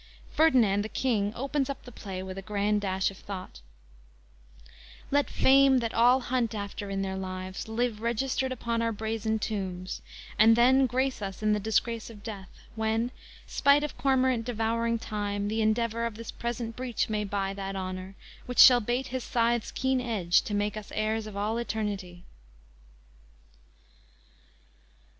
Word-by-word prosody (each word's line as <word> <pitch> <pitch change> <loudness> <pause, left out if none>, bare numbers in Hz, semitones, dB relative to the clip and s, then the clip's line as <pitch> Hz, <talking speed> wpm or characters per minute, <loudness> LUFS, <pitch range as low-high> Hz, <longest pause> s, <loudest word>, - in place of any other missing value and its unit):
Ferdinand, 240 -11 +4
the 215 - -5
King, 215 -6 0
opens 275 +2 -1
up 275 - -5
the 245 - -10
play 190 -4 -6
with 190 0 -6
a 195 - -6
grand 205 +1 0
dash 190 -1 0
of 195 - -13
thought: 185 - -8 1.1
_"Let 285 - -3
fame 270 0 +5
that 230 -2 -1
all 245 +3 +5
hunt 245 -3 -1
after 200 0 -5
in 195 0 -2
their 190 0 -3
lives, 185 +1 -5
Live 220 -1 -1
registered 260 +3 -1
upon 235 -2 -2
our 230 0 +1
brazen 220 0 -2
tombs, 190 -4 -4 0.4
And 225 +1 +7
then 260 +3 +5
grace 260 0 -1
us 195 +1 -5
in 215 0 +3
the 210 - +1
disgrace 220 +2 -1
of 210 -3 -12
death, 200 -5 -7 0.3
When, 225 +2 0 0.3
spite 285 +1 +3
of 300 - -4
cormorant 260 -3 +2
devouring 230 0 0
time, 205 -2 -3
The 220 +1 0
endeavor 230 +1 +1
of 230 - -8
this 230 +1 -7
present 235 -1 -4
breach 250 -2 -2
may 215 -1 -1
buy 195 -1 -2
That 195 0 -5
honor, 185 0 -5 0.3
which 250 - -5
shall 245 -2 +9
bait 245 +4 -2
his 255 -1 -3
scythe's 235 -1 0
keen 260 -1 0
edge 200 -8 +2
To 210 - -2
make 205 0 0
us 215 -1 -8
heirs 215 0 -1
of 205 -2 -8
all 215 +3 -1
eternity." 205 -6 -4
220 Hz, 160 wpm, -28 LUFS, 200-245 Hz, 1.1 s, shall